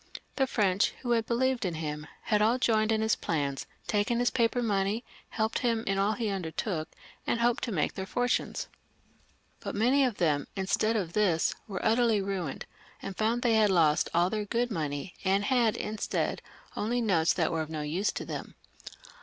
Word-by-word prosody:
The 265 Hz, -1 st, +2 dB
French, 200 Hz, -5 st, +1 dB
who 240 Hz, -, -1 dB
had 230 Hz, -2 st, +2 dB
beKeved 255 Hz, +1 st, +1 dB
in 180 Hz, -4 st, -1 dB
him, 150 Hz, -1 st, -4 dB, 0.2 s
had 210 Hz, -1 st, +2 dB
all 225 Hz, +4 st, +4 dB
joined 220 Hz, -3 st, +2 dB
in 220 Hz, 0 st, +1 dB
his 220 Hz, -, +2 dB
plans, 140 Hz, -4 st, -2 dB, 0.2 s
taken 210 Hz, +3 st, +1 dB
his 245 Hz, 0 st, +2 dB
paper 240 Hz, 0 st, +1 dB
money, 205 Hz, +1 st, 0 dB, 0.3 s
helped 220 Hz, 0 st, -1 dB
him 230 Hz, -2 st, 0 dB
in 195 Hz, 0 st, 0 dB
all 200 Hz, +2 st, +2 dB
he 230 Hz, 0 st, -3 dB
imdertook, 180 Hz, -3 st, -2 dB, 0.4 s
and 235 Hz, -, +1 dB
hoped 235 Hz, 0 st, +1 dB
to 235 Hz, -, -4 dB
make 160 Hz, -7 st, 0 dB
their 190 Hz, 0 st, -5 dB
fortunes; 245 Hz, +5 st, -1 dB, 0.9 s
but -, -, -5 dB
many 250 Hz, +7 st, +3 dB
of 245 Hz, -6 st, 0 dB
them, 150 Hz, -4 st, +1 dB
instead 205 Hz, +3 st, +1 dB
of 180 Hz, -6 st, -2 dB
this, 185 Hz, -6 st, +2 dB
were 195 Hz, -4 st, -4 dB
utterly 225 Hz, -1 st, +3 dB
ruined, 190 Hz, -7 st, -3 dB, 0.3 s
and 195 Hz, -, -6 dB
found 230 Hz, +4 st, 0 dB
they 235 Hz, -2 st, +3 dB
had 215 Hz, -1 st, +4 dB
lost 160 Hz, -5 st, +3 dB
all 175 Hz, +2 st, +2 dB
their 215 Hz, -1 st, -1 dB
good 240 Hz, +3 st, -1 dB
money, 150 Hz, -1 st, -3 dB
and 195 Hz, +1 st, +2 dB
had, 235 Hz, -1 st, +2 dB
instead, 215 Hz, 0 st, -2 dB, 0.3 s
only 235 Hz, +4 st, 0 dB
notes 175 Hz, -8 st, +3 dB
that 170 Hz, -2 st, 0 dB
were 165 Hz, -1 st, 0 dB
of 155 Hz, -, -5 dB
no 155 Hz, -1 st, -4 dB
use 170 Hz, +8 st, 0 dB
to -, -, -5 dB
them. -, -, -6 dB
210 Hz, 185 wpm, -29 LUFS, 175-230 Hz, 0.9 s, all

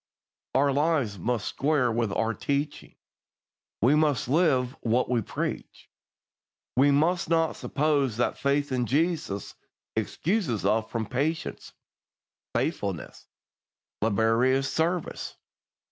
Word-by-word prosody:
Our 140 Hz, +1 st, +3 dB
lives 140 Hz, -, +1 dB
must 115 Hz, +2 st, -1 dB
square 140 Hz, -4 st, +1 dB
with 115 Hz, -2 st, 0 dB
our 115 Hz, 0 st, 0 dB
teaching. 140 Hz, +3 st, -3 dB, 0.9 s
We 130 Hz, +5 st, +5 dB
must 150 Hz, -5 st, +2 dB
live 135 Hz, -4 st, +2 dB
what 120 Hz, +2 st, +1 dB
we 120 Hz, -2 st, +2 dB
preach. -, -, -5 dB, 0.8 s
We 135 Hz, +3 st, +5 dB
must 160 Hz, +5 st, +2 dB
not 165 Hz, -1 st, +2 dB
suppose 140 Hz, -5 st, 0 dB
that 120 Hz, -, +1 dB
faith 140 Hz, 0 st, 0 dB
in 125 Hz, -2 st, 0 dB
Jesus 155 Hz, -, -1 dB, 0.4 s
excuses 165 Hz, -, -1 dB
us 110 Hz, +2 st, +1 dB
from 115 Hz, -2 st, -2 dB
patient, 145 Hz, +8 st, -2 dB, 0.8 s
faithful, -, -, 0 dB, 1.0 s
laborious 115 Hz, +5 st, +2 dB
service. 170 Hz, +1 st, -1 dB
135 Hz, 105 wpm, -27 LUFS, 115-155 Hz, 1.0 s, We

